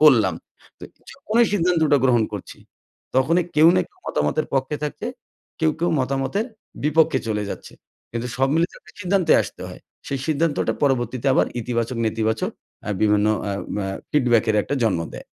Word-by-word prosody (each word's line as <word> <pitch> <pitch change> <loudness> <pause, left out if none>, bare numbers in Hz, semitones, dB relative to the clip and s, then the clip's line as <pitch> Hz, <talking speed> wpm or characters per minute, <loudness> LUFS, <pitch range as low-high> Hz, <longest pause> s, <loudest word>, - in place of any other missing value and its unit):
করলাম। 115 - +6 0.4
তো - - -22 0.3
যখনই 230 +2 +2
সিদ্ধান্তটা 165 -6 +3
গ্রহণ 120 -3 +4
করছি, 100 - -7 0.6
তখনই 165 +6 +3
কেউ 160 +2 +8
না - - +4
কেউ - - -33
মতামতের 75 - 0
পক্ষে 135 +3 0
থাকছে, 150 +8 -4 0.5
কেউ, 160 -1 +4
কেউ 170 +1 +1
মতামতের 135 - -1 0.4
বিপক্ষে 160 +1 +3
চলে 105 -1 -1
যাচ্ছে। - - -8 0.4
কিন্তু 120 +1 -3
সব 135 +1 +2
মিলে 165 +1 +4
একটা - - -19
সিদ্ধান্তে 185 -3 +2
আসতে - - -9
হয়। - - -10 0.3
সেই 135 - -2
সিদ্ধান্তটা 155 0 +1
পরবর্তীতে 130 -2 0
আবার - - +3
ইতিবাচক, 115 +1 -2
নেতিবাচক 110 0 0 0.5
বিভিন্ন 105 0 +3 0.2
অ্যা 100 -1 -2 0.2
ম্যা 95 -2 -2 0.2
ফিডব্যাক 120 -6 +3
এর 105 - +2
একটা 145 - -2
জন্ম 95 -6 +1
দেয়। - - -8
135 Hz, 155 wpm, -22 LUFS, 115-160 Hz, 0.6 s, কেউ